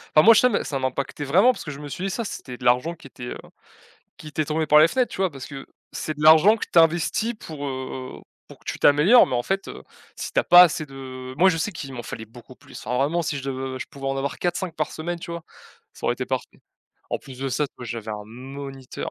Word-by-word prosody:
enfin 155 - +9
moi 230 +2 +9
je - - +7
sais 250 - +5
mais 205 - 0
ça 140 - -3
m'impactait 135 +2 -3
vraiment 195 - +5
parce - - -8
que 150 - -5
je 140 - -9
me 145 - -7
suis 185 +7 -4
dit: - - -1
«Ça, 235 - -2
c'était 125 - -7
de - - -13
l'argent 125 +7 +2
qui 155 - -14
était, 125 -2 -10
heu, - - -5 0.8
qui 155 - -11
était 150 +1 -2
tombé 155 +1 -1
par 150 +1 +6
les 155 - +7
fenêtres», 255 +3 0
tu - - -7
vois? 190 -1 +1
Parce 135 -3 -9
que 135 -2 -9 0.2
c'est 155 -1 -4
de 150 - -4
l'argent 160 +8 +7
que - - -5
tu 170 - +6
investis 170 +8 +2
pour, 145 -3 -6
heu, 130 -1 -6 0.3
pour - - -14
que - - -26
tu - - -4
t'améliores, 160 +12 +6
mais 125 - -2
en 120 - 0
fait, 195 0 -2
heu, 65 - -9 0.3
si - - -5
tu - - +2
as - - +1
pas 175 0 +9
assez 155 -2 0
de 130 -1 -9
moi, 190 +3 +6
je 165 - 0
sais 185 +6 -1
qu'il 135 -3 -7
m'en 120 - -6
fallait 110 - -7
beaucoup 120 +3 -15
plus. - - -13
Enfin 125 +1 0
vraiment 155 +5 +1
si 150 -2 -2
je 130 -1 -4
je - - -5
pouvais 135 -1 -6
en 135 - -1
avoir 140 +1 -3
4-5 175 -1 -2
par 155 - -1
semaine 170 +2 -4
tu 170 - -9
vois? 170 -1 -6 0.5
Ça - - -7
aurait - - +2
été - - -4
parfait. - - -4 0.5
En - - -1
plus 130 -2 -12
de 135 0 -2
ça 130 +4 0
tu - - -58
vois 125 - -7
j'avais 115 -1 -5
un 105 -1 -5
moniteur. 135 +2 -8
145 Hz, 275 wpm, -24 LUFS, 130-170 Hz, 0.8 s, enfin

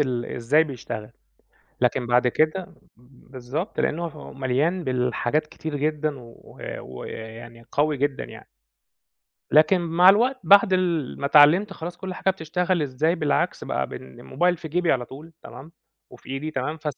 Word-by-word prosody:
ال 125 -4 0
إزاي 140 +7 +2
بيشتغل، 115 -6 -7 0.7
لكن 125 -2 +1
بعد 125 +1 +3
كده 160 +7 0 0.2
بالضبط 130 - -7
لأنه 170 +3 -1
هو 155 -2 -10
مليان 140 +7 0
بالحاجات 125 +3 0
كتير 155 -1 -6
جدًا 150 -1 -1
و 115 -1 -15 0.2
و 65 0 -9
يعني 115 +1 -9
قوي 150 0 +1
جدًا 140 0 -1
يعني. - - -12 1.0
لكن 155 +5 +5
مع 170 +2 +4
الوقت 245 +7 +4
بعد 200 0 +6
ال 175 -7 0
ما 140 - 0
اتعلّمت 155 +8 +6
خلاص 175 -1 -7
كل 185 0 -6
حاجة 190 - +1
بتشتغل 180 0 -1
إزاي، 150 +5 0
بالعكس 150 -4 -1
بقى 65 0 -2
بالموبايل 120 - -2
في 160 -1 -8
جيبي 175 +2 +1
على 125 -2 -1
طول 150 +7 -12
تمام، 155 +5 -12 0.4
وفي - - -15
إيدي 140 +4 -4
تمام، 150 +2 -3
فس 150 -2 -4
150 Hz, 150 wpm, -24 LUFS, 125-170 Hz, 1.0 s, بعد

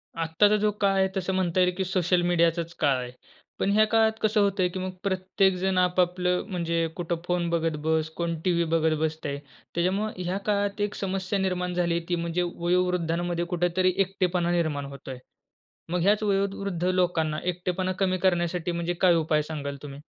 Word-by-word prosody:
आत्ताचा 165 +6 +3
जो 210 0 +2
काळ 195 -1 +3
आहे 190 - +4
तसं 190 0 -1
म्हणता 185 -1 0
येईल, 180 0 +3
की 190 - 0
सोशल 180 -1 +1
मीडियाचाच 170 -1 +1
काळ 140 -3 +3
आहे. 125 0 -6 0.5
पण 195 - +1
ह्या 215 +1 +5
काळात 220 0 +4
कसं 215 0 +2
होतंय, 195 -2 +2
की 185 - -5
मग 185 0 -3
प्रत्येक 190 0 +1
जण 190 +1 0
आपआपलं 180 0 +2
म्हणजे 170 -4 -1
कुठं 175 -1 -2
फोन 175 -1 0
बघत 165 -2 0
बस. 160 0 +1
कोण 170 -1 -2
टीव्ही 170 -2 +2
बघत 160 -1 +3
बसतंय. 155 -2 -2 0.4
त्याच्यामुळं 190 +5 0
ह्या 180 +1 -2
काळात 205 0 0
एक 205 0 -1
समस्या 195 0 -2
निर्माण 180 -1 -1
झाली 170 -1 +1
ती 175 - +2
म्हणजे 170 +1 -1
वयोवृद्धांमध्ये 175 -1 0
कुठेतरी 175 +1 +1
एकटेपणा 185 -2 +1
निर्माण 155 -5 0
होतोय. 140 -1 -8 0.7
मग 180 - +1
ह्याच 205 +4 +3
वयोवृद्ध 195 -3 -1
लोकांना 175 -4 +1
एकटेपणा 180 +1 -1
कमी 185 -1 +1
करण्यासाठी 175 -1 +1
म्हणजे 170 0 -2
काय 180 -2 +6
उपाय 155 -2 +2
सांगाल 145 -2 -5
तुम्ही? 140 -1 -8
180 Hz, 170 wpm, -26 LUFS, 170-190 Hz, 0.7 s, काय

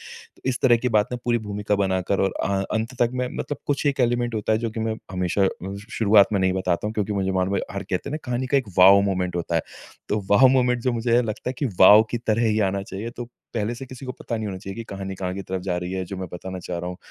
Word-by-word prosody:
तो - - -18
इस 130 -2 -1
तरह 120 -2 +6
की - - +3
बात 105 - +1
ना, 125 - -2
पूरी 120 -1 +2
भूमिका 105 0 -1
बनाकर 95 +1 0
और 95 -1 +1
अ, - - 0 0.3
अंत 115 +3 -2
तक 120 - +2
मैं 125 0 -1
मतलब 145 - -4
कुछ 145 +1 0
एक 140 -2 +1
एलिमेंट 120 -1 +1
होता 110 0 0
है 110 - +2
जो 115 -1 -2
कि 110 - -5
मैं 110 0 -1 0.2
हमेशा 90 +2 +1
अ, - - +4 0.3
श 105 - -13
शुरुआत 105 -2 +6
में 100 - +2
नहीं 95 0 +2
बताता 95 0 -1
हूँ, 110 - -3
क्योंकि 105 0 -1
मुझे 95 -1 0
मालूम 95 +1 0
है - - +1
हर 100 - -4
कहते 90 +8 -3
है - - -5
ना - - -1
कहानी 125 +1 -2
का 140 - +1
एक 130 -6 0
वाओ 95 +2 +8
मोमेंट 90 -3 -1
होता 85 0 -3
है। 80 - +2 0.5
तो 105 0 0
वाओ 125 +6 +7
मोमेंट 125 -2 +2
जो 125 - +1
मुझे 115 0 0
है 125 - +4
लगता 110 +2 -4
है - - -3
कि 140 - 0
वाओ 105 +3 +9
की 120 - -1
तरह 115 0 0
ही 110 0 +1
आना 100 0 -2
चाहिए। 110 +2 -6
तो, 120 0 -7 0.3
पहले 115 +1 -1
से 135 +2 -8
किसी 130 +1 -10
को 130 - -4
पता 115 - -5
नहीं 110 -1 -3
होना 95 -2 -5
चाहिए 95 0 -7
कि 115 - -5
कहानी 95 0 -5
कहाँ 90 -1 -4
की 100 - -5
तरफ़ 95 0 -4
जा 90 -2 -1
रही 90 +1 -4
है, 95 -1 -2
जो 95 +2 -7
मैं 95 -1 -5
बताना 95 +1 -6
चाह 90 -1 -5
रहा 90 +1 -4
हूँ। 90 - -7
105 Hz, 295 wpm, -24 LUFS, 95-120 Hz, 0.5 s, वाओ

